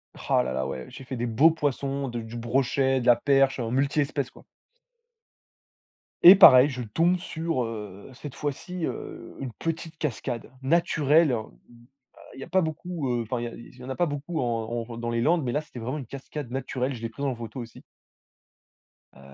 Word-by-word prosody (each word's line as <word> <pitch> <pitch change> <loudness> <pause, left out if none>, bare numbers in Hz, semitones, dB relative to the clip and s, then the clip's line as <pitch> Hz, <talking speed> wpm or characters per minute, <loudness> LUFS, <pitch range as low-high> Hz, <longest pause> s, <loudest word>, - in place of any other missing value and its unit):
Rah - - +1
là 65 - -3
là, 65 0 -1
ouais. 65 -2 -5
J'ai - - -10
fait 130 +1 -6
des 120 - -1
beaux 120 +8 +5
poissons, 140 -3 -2
de 120 -2 -4
du 115 +1 -8
brochet, 130 +2 +1
de - - -5
la 120 -1 +7
perche, 135 -1 +2
un 115 -1 -2
multi-espèces, 140 0 0
quoi. - - -17 1.8
Et 180 - +13
pareil, 140 -8 +9
je 125 -3 -5
tombe 165 +11 +1
sur, 165 -5 -2
heu, 105 -2 -7
cette 140 +1 -8
fois-ci, 160 +4 -4
heu, - - -7
une 135 -3 -5
petite 165 +1 -5
cascade, 120 -5 -4
naturelle. 155 -2 +3 1.0
Il - - -12
y - - -6
a - - -9
pas 190 0 +2
beaucoup, 160 -2 -3
heu, 120 - 0
enfin 120 +2 -3
il 120 -1 -5
il - - -18
y 125 - -12
en 130 - -8
a 130 - -3
pas 175 - +2
beaucoup 145 +3 -4
en 115 -1 -2
en 115 - -7
dans 120 0 -3
les 115 0 0
landes. 165 +3 +2
Mais 125 - -1
là, 150 +4 0
c'était 150 - -14
vraiment 130 +6 -3
une 135 - -7
cascade 140 0 -7
naturelle. 130 0 -2
Je 115 - -10
l'ai 115 - -2
prise 140 +5 -5
en 130 -3 -1
photo 115 +3 -7
aussi. 115 -1 -10 1.3
Heu, - - -17
135 Hz, 200 wpm, -26 LUFS, 120-150 Hz, 1.8 s, Et